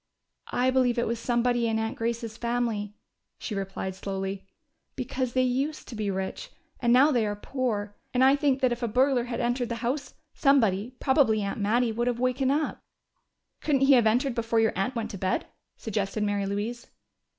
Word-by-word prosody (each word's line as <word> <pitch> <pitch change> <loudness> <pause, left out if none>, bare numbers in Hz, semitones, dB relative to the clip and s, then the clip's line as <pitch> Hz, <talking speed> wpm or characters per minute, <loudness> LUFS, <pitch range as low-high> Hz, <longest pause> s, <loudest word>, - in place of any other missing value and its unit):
"I 255 +1 +2
believe 255 -2 +2
it 235 - +1
was 230 0 -2
somebody 240 0 +1
in 225 -1 0
Aunt 220 0 -2
Grace's 230 -1 -3
family," 235 -3 -2 0.4
she 220 - -5
replied 195 -1 -4
slowly. 195 0 -5 0.5
"Because 255 -1 -3
they 255 - +3
used 270 +5 -1
to 235 - -7
be 210 -2 -2
rich, 190 - -4 0.3
and 240 -2 +2
now 270 +5 +6
they 240 -5 +2
are 205 -1 -1
poor. 205 -3 -3 0.2
And 250 +1 +2
I 270 +1 +6
think 280 -2 +1
that 255 -2 +3
if 240 +1 -3
a 235 - 0
burglar 255 +2 +2
had 240 -1 -4
entered 240 0 0
the 235 - -2
house, 270 +4 -2 0.2
somebody, 240 -5 +2
probably 265 -6 +3
Aunt 200 +2 -3
Mattie, 230 +3 +2
would 235 +2 -1
have 240 -1 0
wakened 255 +1 +1
up." 300 +2 -1 0.8
"Couldn't 280 -3 +1
he 275 +1 +6
have 240 -4 +5
entered 245 +4 +2
before 230 -1 0
your 225 -1 +3
aunt 195 +7 -1
went 230 -2 -3
to 195 - -7
bed?" 185 0 0 0.3
suggested 210 -1 -2
Mary 205 -1 0
Louise. 220 +5 -3
235 Hz, 190 wpm, -27 LUFS, 210-255 Hz, 0.8 s, now